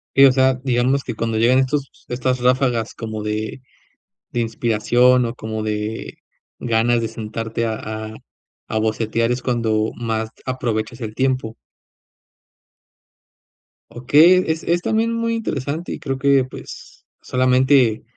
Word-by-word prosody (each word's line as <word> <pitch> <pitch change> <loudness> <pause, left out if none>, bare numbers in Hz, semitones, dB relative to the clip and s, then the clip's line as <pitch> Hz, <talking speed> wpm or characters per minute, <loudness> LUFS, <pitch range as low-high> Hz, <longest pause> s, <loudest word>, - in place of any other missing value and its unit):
Sí, 135 - +8
o 135 - +7
sea, 130 0 +3
digamos 130 +1 +1
que 120 - -4
cuando 115 -1 -2
llegan 120 +4 +4
estos 135 +1 -2
estas 125 +1 -1
ráfagas 125 -2 +1
como 110 -2 -5
de 110 +4 -3 0.7
de 120 - -2
inspiración 120 +2 +2
o 115 0 -3
como 110 -2 -5
de 110 +1 -4 0.4
ganas 115 0 +2
de 115 - -2
sentarte 115 +1 -4
a 110 0 -5 0.7
bocetear, 115 +1 0
es 125 +1 -3
cuando 110 -3 0
más 110 -1 -2 0.2
aprovechas 120 -2 -3
el 110 -2 -5
tiempo. 130 -3 -1 2.4
Okey, 155 +9 +5
es 160 0 -2
es 175 +1 +1
también 225 +1 +1
muy 230 0 -1
interesante 155 - -3
y - - -4
creo 135 0 -4
que, 140 -1 +4
pues, 130 - -11 0.2
solamente 130 -2 +3
120 Hz, 130 wpm, -20 LUFS, 110-130 Hz, 2.4 s, Sí